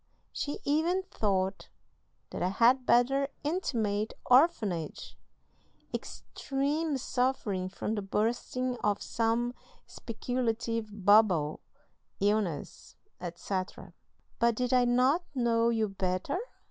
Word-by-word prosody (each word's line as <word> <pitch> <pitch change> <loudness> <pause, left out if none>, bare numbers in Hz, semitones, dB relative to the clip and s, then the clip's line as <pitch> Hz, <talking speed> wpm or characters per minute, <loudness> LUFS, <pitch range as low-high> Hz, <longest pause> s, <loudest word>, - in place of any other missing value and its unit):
She 290 - -3
even 335 +6 +1
thought 195 -2 -1 0.6
that - - -5
I 180 - +2
had 245 +6 +3
better 270 +3 +4 0.2
intimate 225 - -1
orphanage, 235 - +2 0.8
extreme 285 +2 -2
suffering 240 -8 -1
from 205 +3 -3
the 210 - -2
bursting 240 +5 -1
of 210 -3 0
some 230 +1 0 0.3
speculative 230 -3 -3
bubble, 195 -8 +4 0.6
illness, 200 -6 -1 0.2
etc.; 185 +2 -5 0.5
but 235 -1 +3
did 250 +2 -1
I 250 -1 +5
not 255 +8 +3
know 235 -2 +2
you 225 -2 +1
better? 190 - -2
230 Hz, 95 wpm, -30 LUFS, 205-255 Hz, 0.8 s, I